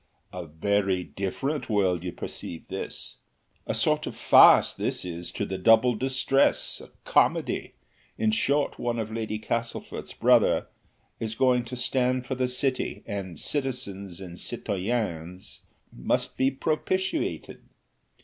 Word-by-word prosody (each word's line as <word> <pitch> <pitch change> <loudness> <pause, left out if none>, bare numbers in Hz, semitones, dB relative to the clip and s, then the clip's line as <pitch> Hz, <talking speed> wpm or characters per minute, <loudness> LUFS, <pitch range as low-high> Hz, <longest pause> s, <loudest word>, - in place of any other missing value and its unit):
"A 90 -2 -6
very 95 +3 0
different 130 - -3
world 95 -5 +1
you 90 - -3
perceive 85 -1 -7
this! - - -6 0.5
A - - -1
sort - - +1
of - - -5
farce - - +7
this - - -3
is 85 -1 -5
to 105 - -2
the 95 -1 -4
'Double 115 +5 +5
Distress,' 130 +3 +1
a - - -13 0.2
comedy; - - +1 0.4
in 110 -1 +2
short, 140 +6 +1
one 120 -1 -1
of 110 -1 -3
Lord 110 -1 -3
Castlefort's 115 +1 -4
brothers - - +4 0.6
is 110 -1 -3
going 125 -1 +3
to 125 +1 -6
stand 125 0 0
for 135 - -3
the 130 -1 0
City, 130 +1 -1
and 95 -7 -5
citizens 100 - -3
and 90 -2 -9
citoyennes 95 -5 -3 0.4
must - - -1
be 130 - +3
propitiated. 185 - -2
110 Hz, 130 wpm, -27 LUFS, 95-130 Hz, 0.6 s, farce